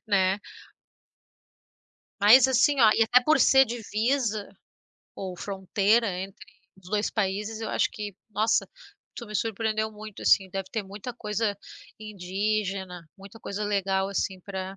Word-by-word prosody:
né? 195 -2 +2 1.8
Mas 240 +6 +7
assim 265 +2 +3
ó, 220 -2 +7
e - - +3
até 250 +3 +4
por 305 +5 +3
ser 265 0 +6
divisa 225 -1 -1 0.7
ou 185 -2 -6
fronteira 200 +4 +1
entre 195 +1 -9 0.3
os 190 -1 -16
2 210 0 0
países, 210 +2 -2
eu 220 - -4
acho - - +1
que, 205 -2 -7 0.2
nossa, 215 +2 +1 0.5
tu 235 - -8
me 215 - -10
surpreendeu 220 +1 -1
muito, 215 -1 -10
assim. 190 -1 +4
Deve 195 0 -5
ter 220 - -2
muita 200 +5 -8
coisa 210 -2 -2 0.4
indígena, 195 -3 -3
muita 200 +3 -13
coisa 200 +1 -4
legal, 195 -1 0
assim, 190 -1 -2
para 190 0 -6
210 Hz, 140 wpm, -26 LUFS, 195-220 Hz, 1.8 s, Mas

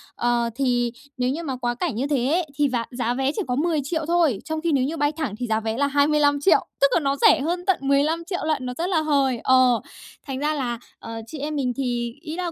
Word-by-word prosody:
Ờ, 240 -1 +1
thì 245 -2 +1 0.3
nếu 250 0 +1
như 310 +6 -3
mà 270 -5 -3
quá 240 -1 -2
cảnh 300 -1 -2
như 265 +5 -1
thế 265 -4 +1
ấy, 345 0 +2
thì 290 -1 +2
giá 240 -2 -1
giá 245 -1 -1
vé 265 +2 0
chỉ - - -1
có 250 - 0
10.000.000 315 +1 -1
thôi. 330 - +2
Trong 315 0 -3
khi 335 0 0
nếu 270 -3 +2
như 305 +5 -2
bay 290 -1 +2
thẳng 305 -10 -4
thì 245 - -2
giá 220 -1 +1
vé 225 +1 -3
là 285 - +2
25.000.000, 285 +2 +3 0.2
tức 280 - +7
là - - +4
nó 275 -2 0
rẻ 315 - +5
hơn 350 +4 -2
tận 380 - +3
15.000.000 315 +6 +1
lận, 300 -5 -1
nó 250 - -3
rất 340 - -1
là 335 -5 +2
hời. 275 -5 +1
Ờ, 255 -2 +4 0.5
thành 265 -1 -4
ra 300 +2 0
là, 245 -5 -2 0.2
ờ, 225 0 -7
chị 300 - -8
em 300 +2 -3
mình 255 -4 0
thì 240 -3 -2
ý 315 0 -6
là 355 -1 -3
280 Hz, 250 wpm, -23 LUFS, 250-315 Hz, 0.5 s, tức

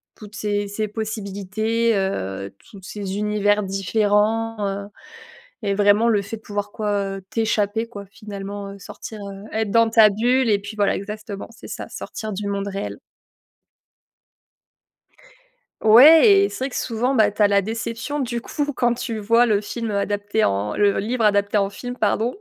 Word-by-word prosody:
Toutes 210 0 -12
ces 205 -1 -1
ces 215 +2 -3
possibilités, 220 +1 -2
heu, 100 - -3 0.2
toutes 195 -3 -13
ces 200 -1 -5
univers 210 0 +1
différents, 210 +3 +1
heu, 200 0 -4 0.8
et 200 -1 0
vraiment 205 +3 +4
le 210 -3 +2
fait 200 +3 -6
de - - -27
pouvoir, 205 0 -4
quoi, 200 -2 -2
heu, - - -12
t'échapper, 220 0 0
quoi, 205 -4 -10
finalement, 200 -1 -7
heu, 200 - -11
sortir, 205 +2 -9
heu, 200 0 -8
être 220 -1 -1
dans 230 +1 +4
ta 220 -1 +7
bulle, 240 +5 +1
et 205 - +3
puis 200 +2 -9
voilà, 205 -1 +2
exactement, 210 0 -7
c'est 230 - -13
ça: - - -6
sortir 220 -2 -6
du 205 +1 -4
monde 200 0 -2
réel. 200 0 -5 2.9
Ouais 315 - +8
et 400 - +1
c'est 260 - -4
vrai - - -3
que - - -9
souvent, 245 +3 -1
bah, 215 -3 +4
tu 210 - -4
as 205 - +7
la 200 0 +2
déception. 230 +6 -4
Du 240 -3 -2
coup, 290 +5 -3
quand 245 -3 +1
tu 235 -1 -4
vois 230 +3 +3
le 210 -2 +2
film 230 +2 -5
adapté 205 +1 -1
en 100 +1 0
le 205 -1 +2
livre 230 +3 -1
adapté 205 0 +2
en 200 -1 +1
film, 245 +4 -7
pardon. 225 +2 0
210 Hz, 170 wpm, -22 LUFS, 200-225 Hz, 2.9 s, Ouais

